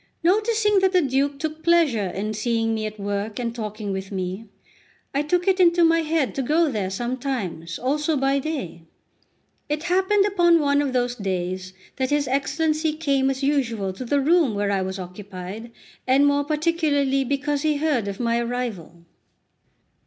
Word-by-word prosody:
Noticing 420 +2 +3
that 380 0 +2
the 365 - +5
Duke 275 +1 0
took 310 +1 -4
pleasure 315 - +3
in 205 +4 -3
seeing 225 +1 0
me 215 -1 -2
at 215 0 -9
work 205 +1 -3
and 235 -2 -2
talking 215 -2 -5
with 190 0 -5
me, 190 +2 -4 0.7
I 280 - +1
took 355 +5 0
it 380 -1 +3
into 345 -1 +5
my 330 0 +4
head 315 -4 0
to 275 - -2
go 305 +4 +2
there 205 -5 -2
sometimes 225 - -3
also 295 +4 0
by 270 +1 +2
day. 270 - -5 0.9
It 300 +1 -2
happened 380 +3 +2
upon 350 -4 +4
one 285 -1 +2
of 275 -3 -2
those 245 -1 +1
days 185 -3 -3 0.2
that 260 -1 0
his 290 -1 +1
Excellency 310 +4 0
came 275 -4 +1
as 270 0 -3
usual 235 -9 0
to 190 - -7
the 280 +4 +1
room 300 -5 +3
where 205 0 0
I 195 -1 +1
was 190 +1 -3
occupied, 190 +4 -8 0.4
and 270 +2 +4
more 285 0 +2
particularly 300 -3 +1
because 285 +2 -1
he 305 -1 +1
heard 285 -8 0
of 200 0 -5
my 235 -1 +1
arrival. 235 -9 -4
270 Hz, 170 wpm, -23 LUFS, 215-310 Hz, 0.9 s, the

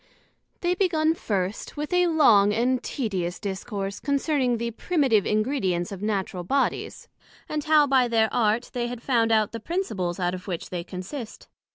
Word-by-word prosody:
They 350 0 +2
begun 325 -4 +2
first 200 - -3
with 300 +4 -3
a 360 0 +4
long 230 -12 +5
and 250 +2 +1
tedious 190 -10 -3
Discourse 200 0 -4
concerning 280 -3 +1
the 235 +1 -3
Primitive 260 - +1
Ingredients 210 -6 0
of 195 -1 -7
Natural 195 -4 -2
bodies; 270 +10 -1 0.4
and 300 -1 -3
how, 305 -1 +5
by 265 -3 +3
their 225 -2 +3
Art, 225 +1 +1
they 240 -1 -1
had 240 -1 -7
found 230 -4 +2
out 215 -2 +3
the 230 - -5
principles 210 - -3
out 180 -1 0
of 185 +1 -7
which 175 -3 -5
they 175 -2 -3
consist. 200 +7 -8
230 Hz, 165 wpm, -25 LUFS, 195-280 Hz, 0.4 s, long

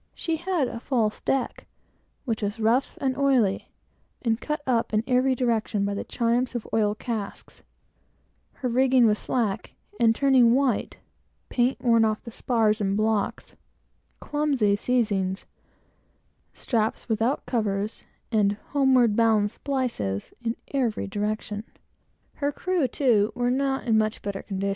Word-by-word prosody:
She 330 -1 -2
had 345 -5 0
a 230 - -6
false 230 -4 -1
deck, 270 -2 -2 0.6
which 230 -4 -2
was 205 +2 -3
rough 230 +5 +1
and 265 -1 0
oily, 255 -9 +2 0.5
and 230 -1 0
cut 300 -1 -3
up 235 -3 0
in 215 - +2
every 255 +1 +2
direction 225 -4 0
by 200 - -1
the 200 - -3
chimes 240 +2 0
of 240 - -4
oil 210 -2 +2
casks; 215 -3 -6 0.9
her 255 - -4
rigging 255 0 +4
was 210 -1 +3
slack 225 -6 -2 0.2
and 225 -1 +4
turning 255 -3 +5
white; 265 -4 0
no - - -36 0.4
paint 250 +1 +1
on 225 -3 +3
the 235 - -8
spars 220 -3 +1
or - - +1
blocks; 210 +1 -1 0.6
clumsy 280 -9 +1
seizings 205 -5 0
and - - -33 1.1
straps 225 -4 -1
without 225 +4 0
covers, 210 -3 -2 0.3
and 205 -3 +3 0.2
homeward 260 -6 +3
bound 220 -2 +3
splices 235 - -3
in 230 0 -1 0.2
every 245 -6 0
direction. 210 +1 -3 0.7
Her 285 0 0
crew, 360 -2 0
too, 230 -5 +2
were 245 0 +1
not 270 +1 0
in 225 -3 +3
much 215 0 -1
better 200 -1 -4
order. 195 +1 -1
230 Hz, 140 wpm, -25 LUFS, 215-260 Hz, 1.1 s, turning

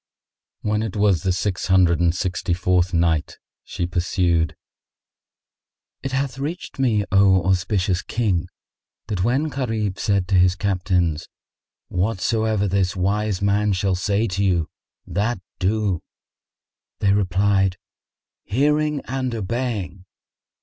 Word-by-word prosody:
When 105 0 0
it 110 -4 -4
was 100 -4 +3
the 95 - +1
Six 95 +1 -2
Hundred 90 -3 +4
and 85 0 +2
Sixty 90 -1 -1
fourth 90 0 +1
Night, 85 -3 +1 0.3
She 90 - -3
pursued, 85 -2 0 1.5
It 135 - -4
hath 135 0 -2
reached 155 +2 -5
me, 115 -6 +2
O 95 -2 +5
auspicious 95 0 +1
King, 95 -7 -1 0.6
that 95 -4 -1
when 130 +8 +1
Gharib 110 -8 -2
said 100 -3 +1
to 95 - +2
his 90 0 +4
Captains, 90 -4 0 0.6
"Whatsoever 110 +2 0
this 95 -1 0
wise 100 +1 0
man 100 +1 +2
shall 95 +1 0
say 100 +5 0
to 95 +2 -1
you, 90 -5 +1 0.3
that 105 +2 -1 0.2
do"; 100 -2 0 1.0
they 100 -1 +2
replied, 95 -1 +2 0.7
"Hearing 150 +5 +1
and 130 -1 -2
obeying!" 105 -4 -3
100 Hz, 120 wpm, -22 LUFS, 90-110 Hz, 1.5 s, O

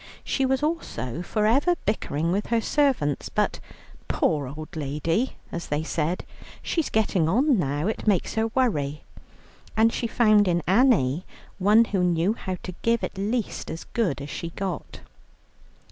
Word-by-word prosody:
She 270 -1 0
was 265 +2 0
also 235 - -2
for 210 +4 -1
ever 280 +11 +3
bickering 165 -6 -1
with 200 +3 -1
her 230 0 +2
servants, 235 - +1
but - - 0 0.5
"poor 145 -4 +1
old 155 +4 -8
lady" 155 - -1 0.2
as 170 - -5
they 150 +1 -1
said, 165 +2 -2 0.4
"she's 330 -3 -1
getting 190 -7 +1
on 255 - +3
now, 145 0 -1
it 220 +1 -3
makes 195 -5 +2
her 225 0 +1
worry," 155 - 0 0.7
and 225 +1 +4
she 235 - -1
found 215 -3 +4
in 175 -2 +1
Annie 185 - +3 0.4
one 210 +4 +5
who 195 -4 0
knew 175 +3 +2
how 185 -5 -5
to 185 - -6
give 230 0 +1
at - - -3
least 215 +3 -2
as 165 - -5
good 195 -12 0
as 145 - -7
she 170 - -4
got. 185 0 -5
195 Hz, 160 wpm, -25 LUFS, 160-230 Hz, 0.7 s, one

